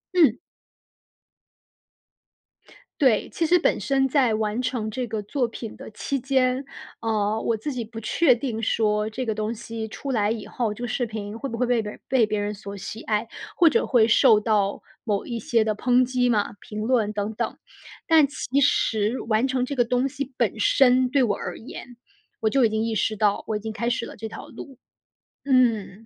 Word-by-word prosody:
嗯。 300 -10 +5 2.6
对， 250 -7 +3
其 330 - -1
实 355 +3 +4
本 - - +2
身 270 -1 +1
在 260 -4 +2
完 215 +2 -1
成 245 -3 -2
这 250 +3 -3
个 220 -2 -4
作 250 +5 -1
品 225 -1 -8
的 - - -10
期 275 +6 -3
间， 260 0 +1 0.4
呃， 215 -1 0
我 230 - 0
自 275 +7 -4
己 245 -2 -3
不 225 +1 -9
确 250 +6 +3
定 230 -2 -4
说 210 0 +1
这 250 +4 -4
个 220 -2 -1
东 215 +1 -2
西 230 -1 -6
出 275 +5 -5
来 210 -4 +1
以 225 -2 -4
后， 230 -4 -2
这 210 - -11
个 245 - -2
视 245 +2 -1
频 215 -1 -6
会 275 +3 -5
不 230 - -5
会 250 - +1
被 240 -1 +2
别 210 - -5
人 - - -13
被 255 -4 +3
别 210 0 -2
人 205 0 -2
所 200 -1 -8
喜 220 +3 -7
爱， 215 +1 -1 0.3
或 345 - +6
者 - - +1
会 230 -3 +4
受 230 -1 +6
到 210 -2 0 0.2
某 205 -4 -1
一 235 - -4
些 230 0 +1
的 215 -1 0
抨 250 +3 +3
击 250 0 +1
嘛， 210 -3 +1
评 215 0 -6
论 225 -3 +1
等 205 +1 -3
等。 - - -3 0.5
但 320 -2 +6
其 280 -1 -1
实 225 -4 +2
完 220 +2 +2
成 260 -1 0
这 280 - -4
个 245 - +3
东 250 +2 +1
西 280 0 -5
本 230 -3 0
身 250 +3 +4
对 275 +1 +2
我 215 -5 +2
而 - - -6
言， 245 -1 -10 0.4
我 220 - +1
就 265 +3 +3
已 225 - +4
经 220 0 -1
意 225 -1 -2
识 215 +1 0
到 205 -1 +1
我 215 - -1
已 - - -6
经 220 +1 -6
开 235 +2 -1
始 235 -1 -1
了 - - -10
这 225 - -6
条 - - -9
路。 270 -4 -11 0.7
嗯。 230 -6 +1
230 Hz, 220 characters per minute, -24 LUFS, 215-255 Hz, 2.6 s, 或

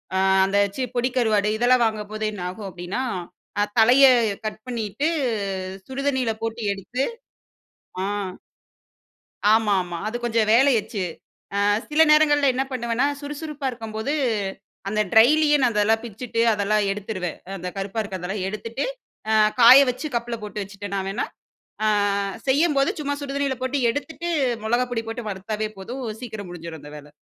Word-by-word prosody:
ஆ - - +2 0.3
அந்த 195 +1 0 0.2
சி 265 - -3
பொடி 245 +1 +1
கருவாடு 215 -4 +2
இதெல்லாம் 245 +1 +4
வாங்கும்போது 215 0 -3
என்ன 205 - -7
ஆகும் 200 +2 -7
அப்டின்னா, 180 +7 -4 0.6
அ - - +4 0.2
தலைய 245 +5 +7 0.4
கட் 215 - -4
பண்ணிட்டு 240 +4 -2 0.8
சுடு 265 +1 -5
தண்ணியில 260 -5 +1
போட்டு 225 +1 -3
எடுத்து 200 +7 -5 1.0
ஆ. - - 0 1.5
ஆமாமா. 195 -6 +1
அது 220 - -4
கொஞ்சம் 225 -2 +1
வேலையச்சு. 235 -5 +3 0.6
ஆ - - +1 0.3
சில 305 +2 +5
நேரங்கள்ல 295 -2 +5
என்ன 265 +1 0
பண்ணுவேன்னா 240 +2 0
சுறுசுறுப்பா 295 0 -5
இருக்கும்போது. 225 +2 -4 0.8
அந்த 215 +1 0
ட்ரைலியே 295 +6 +6
நான் 240 -2 +3
அதெல்லாம் 220 +2 +2
பிச்சுட்டு 230 +1 -3
அதெல்லாம் 210 0 +1
எடுத்துருவேன் 195 -4 -4 0.2
அந்த 180 0 -5
கருப்பா 195 +3 -3
இருக்கறதெல்லாம் 190 -1 -4
எடுத்துட்டு 230 +5 -4 0.5
ஆ - - +3 0.3
காய 245 +3 +10
வச்சு 255 +5 -5
கப்புல 235 0 -2
போட்டு 210 0 -5
வச்சுட்டேன்னா 200 0 -5
வேணா, 205 +5 -1 0.6
ஆ - - +3 0.6
செய்யும்போது 280 0 +3
சும்மா 285 -1 -1
சுடு 275 -1 -5
தண்ணியில 275 -2 0
போட்டு 260 +2 -1
எடுத்துட்டு 320 +7 -4 0.3
மொளகா 240 +3 +1
பொடி 230 -2 -1
போட்டு 225 -1 -5
வறுத்தாவே 210 +2 -3
போதும் 250 +7 -6 0.2
சீக்கிரம் 215 -6 -7
முடிஞ்சிரும் 165 -3 -8
அந்த 145 - -11
வேல. 145 0 -14
225 Hz, 140 wpm, -23 LUFS, 205-260 Hz, 1.5 s, காய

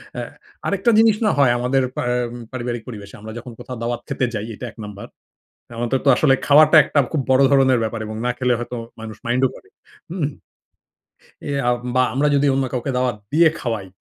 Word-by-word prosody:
হ্যাঁ। - - -5 0.4
আরেকটা 200 +4 +2
জিনিস, 225 -2 +5
না 210 - +4
হয় 135 -4 +5
আমাদের 130 +2 +1
পা - - -2
এম 120 -1 -2 0.2
পারিবারিক 120 -2 -4
পরিবেশে। 100 -4 -9
আমরা 110 +1 -8
যখন 120 +1 -8
কোথাও 125 - -7
দাওয়াত 120 0 -2
খেতে 125 - -1
যাই, 105 -1 -3
এটা 125 - -7
১ - - -29
নাম্বার। 100 -1 -9 0.7
আমাদের 120 +3 -1
তো - - +3
আসলে 140 -4 +4
খাওয়াটা 155 +2 +6
একটা 145 - -1
খুব 150 - 0
বড় 130 +1 +5
ধরনের 130 -2 +4
ব্যাপার 110 0 -3
এবং 110 0 -6
না - - +2
খেলে 125 -1 +1
হয়তো 120 +1 -5 0.2
মানুষ 110 -1 -8
মাইন্ডও 125 +2 +2
করে, 400 - -17 0.4
হুম? 165 -5 -1 1.2
এ - - -1 0.2
আ - - +4 0.2
বা 130 - +4
আমরা 140 +3 +2
যদি 140 +1 +3
অন্য 135 0 +1
কাউকে 125 +2 -2
দাওয়াত 125 -3 0 0.2
দিয়ে 160 +1 +6
খাওয়াই, 110 -6 -3
125 Hz, 195 wpm, -21 LUFS, 120-140 Hz, 1.2 s, খাওয়াটা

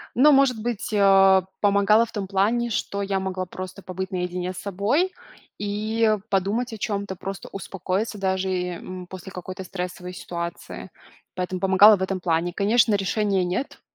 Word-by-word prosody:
Но 295 +5 +6
может 270 -5 +4
быть, 225 -2 -3
а, 195 -2 +5 0.2
помогала 205 +2 +4
в - - -14
том 200 -3 -4
плане, 215 +5 +1
что 200 -2 -2
я 195 -1 -1
могла 190 -1 -3
просто 185 +2 -8
побыть 190 0 -5
наедине 180 0 -3
с - - -12
собой 210 - 0 0.4
и 215 +2 0
подумать 205 +5 0
о - - -6
чем-то, 200 -2 -3
просто 195 +2 -7
успокоиться 195 +2 -3
даже, 190 -1 -1
э, 180 -1 -2
м, 185 0 -8
после 185 0 -9
какой-то 185 +1 -7
стрессовой 180 0 -6
ситуации. 170 -1 -6 0.5
Поэтому 180 0 -3
помогала 195 +3 +7
в 190 - -8
этом 190 0 -1
плане. 175 0 0
Конечно, 215 +3 +3
решения 195 -1 0
нет, 185 +11 -3
195 Hz, 160 wpm, -24 LUFS, 185-210 Hz, 0.5 s, помогала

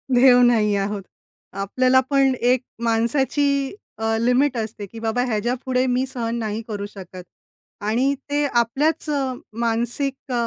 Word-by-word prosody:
देव 250 0 +7
नाही 220 -4 +3
आहोत. 200 +1 -2 0.5
आपल्याला 255 +7 +2
पण 275 -2 +3
एक 245 +1 +3 0.2
माणसाची 270 - +1 0.2
अ, 225 0 0
लिमिट 250 +3 +2
असते 220 -2 -4
की 230 - -9
बाबा 225 +2 0
ह्याच्यापुढे 250 +3 -1
मी 250 +1 +1
सहन 235 -3 -3
नाही 220 -1 -3
करू 205 -2 -4
शकत. 185 -3 -10 0.6
आणि 235 +7 +1 0.2
ते 290 +1 +1
आपल्याच 275 +6 +1
अ, 275 -3 0 0.3
मानसिक 240 +4 -2
अ, - - -1
245 Hz, 140 wpm, -22 LUFS, 225-265 Hz, 0.6 s, देव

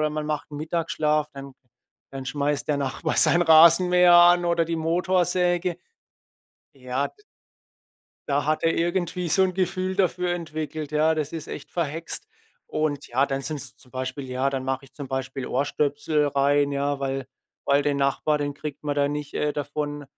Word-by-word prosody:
oder 155 0 +1
man 150 0 -3
macht 150 -1 -3
Mittagsschlaf, 155 0 -1
dann 140 -1 -10 0.6
dann 135 -1 -7
schmeißt 145 +1 -1
der 145 -1 +1
Nachbar 140 +3 -2
seinen 175 +1 +5
Rasenmäher 175 +2 +6
an 175 0 +7
oder 170 -1 +2
die 165 0 -2
Motorsäge. 175 +1 +1 1.0
Ja, 130 +1 -2
d 420 - -27 1.1
da 145 0 +1
hat 155 +1 0
er 165 - +2
irgendwie 175 +1 -1
so 190 - +4
'n 185 -1 +1
Gefühl 185 0 -1
dafür 180 -2 +1
entwickelt, 155 -2 -5
ja, 155 +1 +3
das 155 -2 -3
ist 165 -2 -6
echt 145 - -8
verhext. 165 -1 -4 0.4
Und 150 -2 -2
ja, 130 +3 +2
dann 135 -1 -2
sind's 145 0 -6
zum 125 - -20
Beispiel 130 +2 -4
ja, 130 +2 0
dann 135 -1 -3
mache 135 0 -2
ich - - -19
zum 140 -3 -8
Beispiel 135 -1 -4
Ohrstöpsel 145 +2 0
rein, 145 0 +2
ja, 140 0 -1
weil 135 -1 -3 0.4
weil 140 +1 +3
den 145 0 0
Nachbar, 140 +2 +1
den 145 -1 -2
kriegt 145 0 -7
man 145 -1 -1
da 140 0 +2
nicht, 145 0 -5
äh, 150 0 -1
davon 145 0 -4
150 Hz, 170 wpm, -25 LUFS, 140-170 Hz, 1.1 s, an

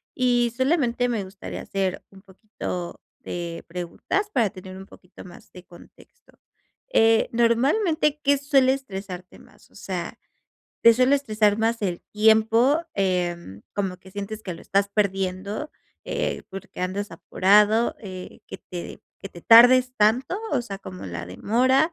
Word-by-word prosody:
Y 245 -2 +2
solamente 260 -3 +1
me 225 -4 -1
gustaría 190 +1 -8
hacer 190 -2 -3
un 195 -1 -17
poquito 190 -3 -7 0.2
de 170 -1 -6
preguntas 180 - -3
para 225 -5 +2
tener 185 -1 -11
un 190 - -10
poquito 180 -1 -15
más 175 -1 -15
de 180 - -12
contexto. 325 - -19 0.6
Eh, 225 0 +4
normalmente, 285 - +2
¿qué 285 0 +3
suele 270 -2 +3
estresarte 195 -8 -8
más? - - -21
O - - -24
sea, - - -5 0.7
te 230 - +8
suele 255 +3 +4
estresar 215 -6 +1
más 225 +1 0
el 180 -3 -2
tiempo, 220 +7 +4
em, 175 - -2
como 190 -3 -2
que 190 +1 -16
sientes 205 +2 -6
que 180 -4 -5
lo - - -12
estás 200 +1 +1
perdiendo, 200 +5 -2 0.3
eh, - - -3
porque 195 -1 -9
andas 195 +3 -3
apurado, 210 +6 +3
eh, 185 -3 -9
que - - -8
te 175 -1 -9 0.2
que 195 - -6
te 175 -3 -14
tardes 250 +2 +7
tanto, 250 - +2
o 255 -4 0
sea, 200 -4 -7
como 95 - -9
la 85 -2 -6
demora, 255 - +1
210 Hz, 150 wpm, -24 LUFS, 185-245 Hz, 0.7 s, te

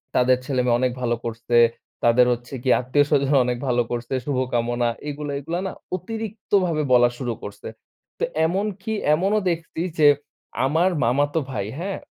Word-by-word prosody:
তাদের 125 0 +4
ছেলেমেয়ে 125 -3 +1
অনেক 130 0 +1
ভালো 120 -1 +1
করছে। 115 +1 -1 0.5
তাদের 120 +1 +5
হচ্ছে 120 +2 -8
গিয়ে 130 - +4
আত্মীয়-স্বজন 140 +2 +2
অনেক 125 0 -1
ভালো 120 -1 +2
করছে 120 +1 -3
শুভকামনা 120 -3 0 0.2
এগুলা, 145 0 -5
এগুলা, 165 +5 -3
না - - -4 0.2
অতিরিক্তভাবে 200 -4 -1
বলা 120 -1 +6
শুরু 125 -3 -2
করছে। 100 0 -8 0.5
তো - - -2 0.2
এমনকি 195 +4 -2 0.2
এমনও 195 +6 +1
দেখছি 165 -1 -3 0.2
যে 150 - +7 0.6
আমার 160 +7 +3
মামাতো 145 +6 +2
ভাই, 105 -5 -3
হ্যাঁ? 190 +2 -3
135 Hz, 145 wpm, -23 LUFS, 120-170 Hz, 0.6 s, যে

